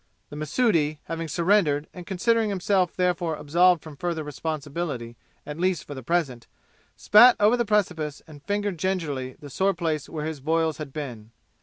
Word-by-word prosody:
The - - -7
Mahsudi, 155 - +1
having 165 0 -4
surrendered 165 -3 +2
and 180 -2 -10
considering 220 +3 +1
himself 190 -2 +1
therefore 175 -3 0
absolved 170 +3 +3
from 155 -2 -10
further 170 0 -2
responsibility 145 -4 -4 0.3
at 150 +2 -7
least 180 -4 0
for 145 - -8
the 130 - -7
present, 130 -5 -1 0.5
spat 240 +4 +7
over 210 +3 +5
the 240 -1 0
precipice 180 -9 -1
and 150 -3 -13
fingered 205 -1 -2
gingerly 150 -9 -2
the 145 -2 -11
sore 190 +6 +1
place 160 -4 -2
where 155 -2 -4
his 160 -2 -4
boils 160 +2 0
had 150 -3 -6
been. 125 -7 -7
165 Hz, 165 wpm, -25 LUFS, 150-185 Hz, 0.5 s, spat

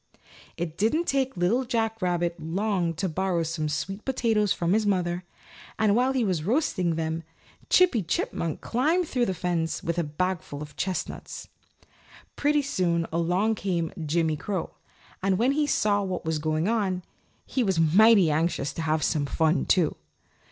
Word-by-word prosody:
It 170 -1 -4
didn't 230 - +2
take 265 - 0
Little 200 +9 +2
Jack 225 -3 -1
Rabbit 175 -1 0
long 175 +1 -1
to 190 +5 -1
borrow 180 0 0
some 160 -1 -2
sweet 195 +8 -3
potatoes 225 -6 +1
from 170 +1 +1
his 220 +1 +3
mother, 180 -2 0 0.5
and 210 -2 +3
while 250 +3 +3
he 260 -2 +1
was 180 -7 0
roasting 185 - +1
them 160 0 -2 0.5
Chippy 355 -12 +4
Chipmunk 165 -2 -2
climbed 315 +9 +1
through 250 -4 0
the 190 - -1
fence 170 -2 -2
with 170 +1 -1
a - - +1
bagful 160 -1 -3
of 150 0 -9
chestnuts. 185 -1 -4 0.9
Pretty 295 0 +2
soon 175 -11 0
along 180 +6 +1
came 175 -6 -2
Jimmy 160 0 +1
Crow, 190 +2 -3 0.5
and 190 0 +1
when 240 +6 +3
he 295 +1 +1
saw 205 -6 +2
what 185 -4 -3
was 160 -1 -1
going 155 +3 0
on, 195 -5 0 0.4
he 260 - -1
was 190 -6 +1
mighty 190 +2 +6
anxious 155 -2 0
to - - -4
have 155 -1 0
some 145 -4 0
fun, 160 +3 +1
too. 175 -5 +3
180 Hz, 160 wpm, -26 LUFS, 165-220 Hz, 0.9 s, mighty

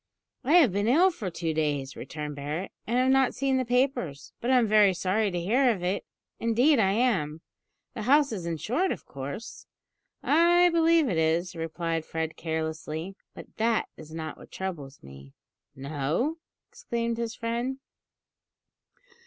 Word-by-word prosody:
"I 290 - +1
have 325 - +6
been 205 +3 0
ill 340 +10 +5
for 215 - -5
two 165 -1 -3
days," 145 -3 -1
returned 150 -1 -6
Barret, 150 +6 -4 0.2
"and 235 +3 0
have 255 +1 +3
not 265 -1 +3
seen 270 -1 +1
the 260 - +1
papers; 245 - -1
but 240 - -2
I'm 250 -3 +5
very 210 -3 +5
sorry 195 +4 +1
to 180 -2 -2
hear 245 +9 +3
of 200 -7 -1
it; 185 +3 -1 0.4
indeed 245 +5 +3
I 195 -3 +3
am. 185 -10 0 0.5
The - - -5
house 280 +4 +4
is 185 -6 -4
insured, 245 - -1
of - - -5
course?" 140 +10 -8 0.6
"I 345 +3 +5
believe 330 -2 +4
it 175 -8 0
is," 165 +3 +1
replied 165 0 -3
Fred 160 0 -4
carelessly; 160 +2 -4 0.2
"but - - -12
that 225 0 +1
is 155 -1 -12
not 160 -1 -6
what - - -14
troubles 150 -8 -6
me." 70 0 -13 0.4
"No?" 150 - -2 0.3
exclaimed 235 0 -3
his 230 -1 -3
friend. 235 +3 -2
195 Hz, 155 wpm, -27 LUFS, 160-250 Hz, 0.6 s, have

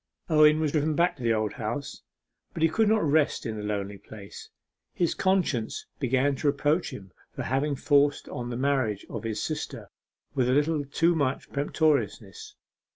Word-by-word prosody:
Owen 155 0 +6
was 155 -2 0
driven 155 0 +1
back 175 +3 +2
to - - -12
the 115 -1 +1
Old 110 -1 -1
House. 135 +4 -5 0.5
But 160 - -1
he 165 - +5
could 220 +6 +2
not 220 -1 +3
rest 150 -2 +2
in 110 -2 -3
the 105 - -5
lonely 100 -1 -3
place. 100 0 -11 0.5
His 170 -2 +1
conscience 180 - 0
began 135 +1 +1
to 150 - -1
reproach 145 +4 +1
him 95 -7 -10 0.2
for - - -4
having 140 +3 0
forced 145 +1 +2
on 120 -1 -5
the 120 - -4
marriage 130 -7 0
of 115 -2 -5
his 110 -2 -3
sister 155 - -5 0.4
with 130 -3 +1
a - - +3
little 150 +1 +1
too 165 +5 +2
much 140 -4 -1
peremptoriness. 160 - -1
140 Hz, 175 wpm, -27 LUFS, 120-155 Hz, 0.5 s, Owen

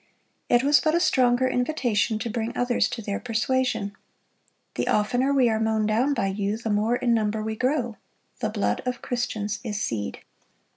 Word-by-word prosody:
It 240 +1 +4
was 285 +1 +5
but 315 0 +1
a - - +4
stronger 255 -5 +3
invitation 245 -5 0
to 230 - -4
bring 230 +1 -3
others 245 0 +2
to 225 - -5
their 200 -1 -3
persuasion. 230 -3 -1 0.8
"The - - -2
oftener 245 +6 +2
we 265 -3 +4
are 220 -1 +1
mown 220 -1 +1
down 240 +7 +2
by - - 0
you, 200 +2 -1
the 225 -1 -3
more 215 +3 +2
in 240 -1 +1
number 215 -1 0
we 220 0 -3
grow; 250 -2 -1 0.4
the 220 -3 -1
blood 210 -1 -1
of 250 -1 -3
Christians 215 -4 -2
is 210 -4 -3
seed." 105 - -3
230 Hz, 180 wpm, -25 LUFS, 215-250 Hz, 0.8 s, was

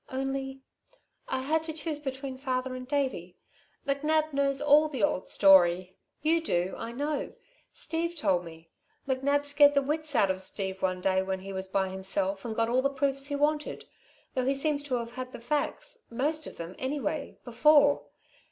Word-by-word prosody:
"Only 270 0 -3 0.6
I 260 0 -2
had 310 +4 +1
to 320 - -4
choose 310 -1 -3
between 270 -1 -5
father 260 -1 -2
and 255 0 -7
Davey. 260 - -2 0.5
McNab 305 +2 +1
knows 275 -1 +1
all 295 +1 +5
the 260 -8 -3
old 185 - +1
story. 185 -2 +5 0.3
You 330 +2 +3
do, 180 - 0
I 230 - -6
know. 290 +4 -3 0.4
Steve 335 +1 -2
told 195 - +1
me. 165 -1 -13 0.4
McNab 280 +2 +1
scared 285 0 +6
the 280 - +3
wits 305 +1 -1
out 195 -4 +4
of 190 0 -4
Steve 190 0 -2
one 185 -1 0
day 190 0 +2
when 190 0 -3
he 195 +1 -7
was 190 0 -3
by 190 0 0
himself 190 +1 -1
and 225 -2 -4
got 225 0 +1
all 250 +2 +2
the 275 - +2
proofs 275 0 0
he 285 - -2
wanted, 295 +1 -1 0.5
though 255 -1 0
he 270 +1 +2
seems 290 +1 0
to 285 -3 -2
have 235 -1 -3
had 255 0 -6
the - - -7
facts 295 - -2
most 300 +6 -1
of - - -10
them, 170 +2 -6
anyway 280 +2 -3
before. 285 +4 +4
265 Hz, 180 wpm, -29 LUFS, 195-290 Hz, 0.6 s, scared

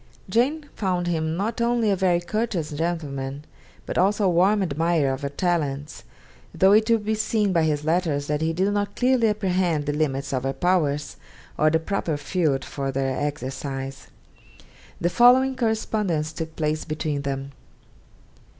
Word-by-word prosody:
Jane 275 +10 +1
found 180 -3 -1
in 175 - +1
him 160 0 -1
not 220 +5 -2
only 235 -2 +2
a - - +3
very 180 -2 +2
courteous 180 -5 -2
gentleman, 145 -3 -3 0.4
but - - -2
also 200 +2 +2
a - - +4
warm 190 +4 +3
admirer 160 -3 +1
of 130 - -6
her 140 - -2
talents; 145 - -2 0.5
though 190 +4 +5
it 215 +2 +4
will 230 - +5
be 215 0 -2
seen 215 -2 0
by 170 - +3
his 150 -2 0
letters 160 -3 0
that 150 +1 -1
he 160 0 +1
did 190 +5 0
not 205 0 -2
clearly 250 -2 +3
apprehend 185 -7 0
the 145 - -1
limits 140 -2 -1
of 130 - 0
her 135 +1 -2
powers, 150 -6 0 0.4
or 155 - +3
the 160 - +3
proper 160 -2 -2
field 150 -3 0
for 135 -1 -3
their 135 0 -1
exercise. 135 -1 -4 0.9
The 175 +1 0
following 260 +4 +5
correspondence 210 -9 -1
took 160 -1 -6
place 155 0 -1
between 155 -2 -3
them. 135 0 -4
165 Hz, 165 wpm, -24 LUFS, 145-200 Hz, 0.9 s, though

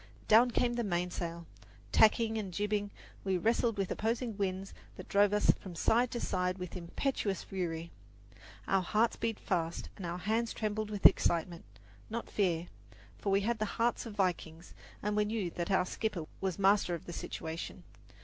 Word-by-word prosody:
Down 235 +3 +7
came 240 0 +1
the 240 0 -1
mainsail. 175 -3 -2 0.5
Tacking 220 0 +5
and 195 -3 -4
jibbing, 205 +2 -1 0.3
we 190 -1 +1
wrestled 230 +3 +1
with 195 -2 -1
opposing 225 +1 -1
winds 195 -1 -2 0.2
that - - -9
drove 200 0 +4
us 210 0 +5
from 185 -3 -9
side 235 +8 +3
to 240 - -3
side 180 -2 -1
with 180 -1 -6
impetuous 195 +3 -2
fury. 170 -3 -4 0.8
Our 195 -1 +3
hearts 215 +5 +2
beat 225 -2 -2
fast, 170 -2 -2
and 195 - -8
our 170 +1 -3
hands 225 +5 0
trembled 215 0 -2
with 205 -2 -5
excitement, 170 -2 +4 0.4
not 230 +1 -5
fear, 175 -5 +1 0.5
for 200 - -1
we 195 +1 +4
had 230 +2 0
the 215 - +1
hearts 235 +1 +1
of 215 - -8
vikings, 175 -3 -2 0.3
and 210 +1 0
we 210 - +3
knew 210 -4 -2
that 170 0 -3
our 190 -2 +3
skipper 185 -4 -3
was 190 -3 -2
master 195 -2 +3
of 165 - -9
the 175 - -7
situation. 165 0 -5
195 Hz, 170 wpm, -32 LUFS, 180-220 Hz, 0.8 s, Down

